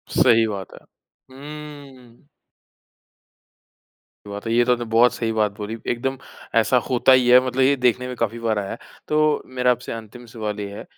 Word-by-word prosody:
सही 115 Hz, -3 st, +5 dB
बात 100 Hz, -3 st, -6 dB
है। -, -, -12 dB, 0.5 s
हम्म। 140 Hz, -3 st, -12 dB, 2.0 s
बात 100 Hz, +1 st, -7 dB
है। 115 Hz, -, -1 dB
ये 120 Hz, +1 st, +4 dB
तो 125 Hz, -, +2 dB
आपने 120 Hz, -1 st, -4 dB
बहुत 115 Hz, +2 st, +4 dB
सही 115 Hz, -1 st, -2 dB
बात 110 Hz, -2 st, +1 dB
बोली 110 Hz, +1 st, -5 dB
एकदम 135 Hz, +3 st, -3 dB, 0.4 s
ऐसा 115 Hz, +2 st, +3 dB
होता 130 Hz, +1 st, +3 dB
ही 130 Hz, -1 st, +5 dB
है, 125 Hz, +1 st, +8 dB
मतलब 130 Hz, +1 st, -1 dB
ये 135 Hz, +2 st, +4 dB
देखने 125 Hz, -1 st, +1 dB
में 125 Hz, -, -6 dB
काफ़ी 115 Hz, 0 st, -2 dB
बार 110 Hz, -2 st, 0 dB
आया 100 Hz, -1 st, -5 dB
है -, -, -6 dB, 0.3 s
तो 155 Hz, 0 st, +2 dB
मेरा 125 Hz, -1 st, +1 dB
आपसे 125 Hz, 0 st, -4 dB
अंतिम 115 Hz, +2 st, -10 dB
सवाल 110 Hz, -2 st, -5 dB
ये 100 Hz, -1 st, -5 dB
है -, -, -8 dB
120 Hz, 180 wpm, -22 LUFS, 110-130 Hz, 2.0 s, है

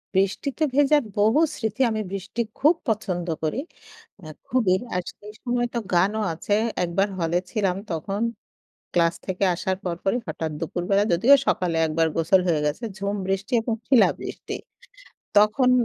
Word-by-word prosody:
বৃষ্টিতে 200 Hz, +10 st, 0 dB
ভেজার 290 Hz, 0 st, +4 dB, 0.2 s
বহু 220 Hz, +8 st, +4 dB, 0.2 s
স্মৃতি। 220 Hz, +1 st, -3 dB
আমি 215 Hz, 0 st, -1 dB
বৃষ্টি 195 Hz, +4 st, -3 dB, 0.2 s
খুব 305 Hz, +5 st, +5 dB
পছন্দ 185 Hz, -5 st, -1 dB, 0.2 s
করি, 155 Hz, +10 st, -1 dB, 0.6 s
মানে 155 Hz, -5 st, -10 dB, 0.2 s
খুবই। 225 Hz, -7 st, +3 dB, 0.2 s
আর 180 Hz, -, 0 dB
সেই 210 Hz, +1 st, -11 dB
সময় 240 Hz, -1 st, 0 dB
তো -, -, +1 dB, 0.2 s
গানও 200 Hz, +5 st, +2 dB
আছে। 205 Hz, +5 st, -1 dB, 0.3 s
একবার 180 Hz, +4 st, +1 dB
হলে 165 Hz, +1 st, +1 dB
ছিলাম, 195 Hz, -5 st, 0 dB, 0.2 s
তখন 195 Hz, +5 st, -3 dB, 0.7 s
ক্লাস 170 Hz, -1 st, +3 dB
থেকে 190 Hz, +1 st, -1 dB
আসার 185 Hz, +2 st, -2 dB
পরপরই 185 Hz, +5 st, -1 dB
হঠাৎ 160 Hz, 0 st, -3 dB
দুপুরবেলা, 180 Hz, +4 st, 0 dB
যদিও 230 Hz, +12 st, +6 dB
সকালে 175 Hz, -3 st, +1 dB
একবার 160 Hz, +1 st, +1 dB
গোসল 165 Hz, +3 st, +4 dB
হয়ে 160 Hz, -3 st, +2 dB
গেছে, 150 Hz, +11 st, -2 dB
ঝুম 200 Hz, 0 st, -2 dB
বৃষ্টি 195 Hz, +5 st, -2 dB
এবং 225 Hz, 0 st, -1 dB
শিলাবৃষ্টি। 260 Hz, -4 st, +1 dB, 0.8 s
তখন 215 Hz, +5 st, +4 dB
195 Hz, 145 wpm, -24 LUFS, 175-225 Hz, 0.8 s, যদিও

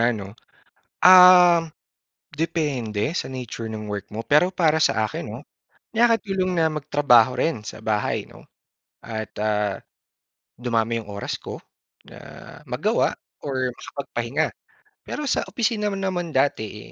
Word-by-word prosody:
'no? 100 Hz, -1 st, -7 dB, 0.7 s
Um, 180 Hz, -3 st, +8 dB, 0.6 s
depende 140 Hz, -10 st, -2 dB, 0.2 s
sa -, -, -2 dB
nature 120 Hz, -3 st, -6 dB
ng 105 Hz, -1 st, -6 dB
work 100 Hz, -1 st, -5 dB
mo, 110 Hz, -, -4 dB
pero 155 Hz, +6 st, +4 dB
para 160 Hz, -4 st, +2 dB
sa 110 Hz, -, +2 dB
akin -, -, -6 dB
'no, 120 Hz, -, -7 dB, 0.6 s
nakakatulong 210 Hz, -5 st, +2 dB
na 160 Hz, -2 st, +2 dB
magtrabaho 140 Hz, -5 st, +3 dB
rin 130 Hz, -1 st, 0 dB
sa 110 Hz, -, -9 dB
bahay 105 Hz, -1 st, -1 dB
'no? -, -, -17 dB, 0.6 s
At, 110 Hz, -2 st, -6 dB
ah, 105 Hz, -2 st, 0 dB, 0.8 s
dumami 115 Hz, -1 st, 0 dB
yung 105 Hz, -, -17 dB
oras 100 Hz, 0 st, -4 dB
ko -, -, -7 dB, 0.5 s
na -, -, -14 dB, 0.5 s
magawa -, -, 0 dB, 0.3 s
or 130 Hz, -3 st, -2 dB
makapagpahinga. 125 Hz, -2 st, -3 dB, 0.6 s
Pero 300 Hz, -, -4 dB
sa -, -, +1 dB
opisina 225 Hz, -3 st, -1 dB
naman 190 Hz, -3 st, -3 dB
dati, 110 Hz, -6 st, -1 dB
130 Hz, 125 wpm, -23 LUFS, 110-175 Hz, 0.8 s, Um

